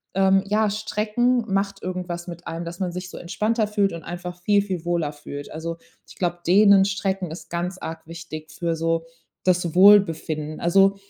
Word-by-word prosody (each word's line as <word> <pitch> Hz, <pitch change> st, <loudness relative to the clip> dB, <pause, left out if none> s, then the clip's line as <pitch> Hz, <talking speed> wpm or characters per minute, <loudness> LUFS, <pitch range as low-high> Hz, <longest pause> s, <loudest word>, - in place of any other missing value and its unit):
ähm, 195 Hz, 0 st, +4 dB
ja, 215 Hz, +1 st, +2 dB
Strecken 215 Hz, +3 st, 0 dB
macht 195 Hz, 0 st, -1 dB
irgendwas 180 Hz, -1 st, -4 dB
mit 175 Hz, 0 st, -8 dB
einem, 165 Hz, +1 st, -4 dB
dass 170 Hz, +1 st, -7 dB
man 185 Hz, -2 st, -1 dB
sich 180 Hz, +1 st, -6 dB
so -, -, -9 dB
entspannter 215 Hz, +5 st, 0 dB
fühlt 205 Hz, -2 st, +1 dB
und 170 Hz, -, -7 dB
einfach 175 Hz, 0 st, -7 dB
viel, 205 Hz, +2 st, +3 dB
viel 185 Hz, -5 st, -4 dB
wohler 170 Hz, -4 st, 0 dB
fühlt. 145 Hz, -1 st, -8 dB
Also, 165 Hz, +1 st, -5 dB, 0.3 s
ich -, -, -14 dB
glaube, 175 Hz, -1 st, -1 dB
Dehnen, 200 Hz, +1 st, +6 dB
Strecken 195 Hz, -2 st, -2 dB
ist 160 Hz, 0 st, -9 dB
ganz 175 Hz, +2 st, -3 dB
arg 160 Hz, -2 st, -7 dB
wichtig 165 Hz, -2 st, -8 dB
für 170 Hz, -1 st, -2 dB
so 165 Hz, 0 st, 0 dB, 0.4 s
das 180 Hz, -2 st, +1 dB
Wohlbefinden. 165 Hz, -6 st, +4 dB
Also, 195 Hz, +3 st, +4 dB
180 Hz, 180 wpm, -23 LUFS, 165-195 Hz, 0.4 s, Dehnen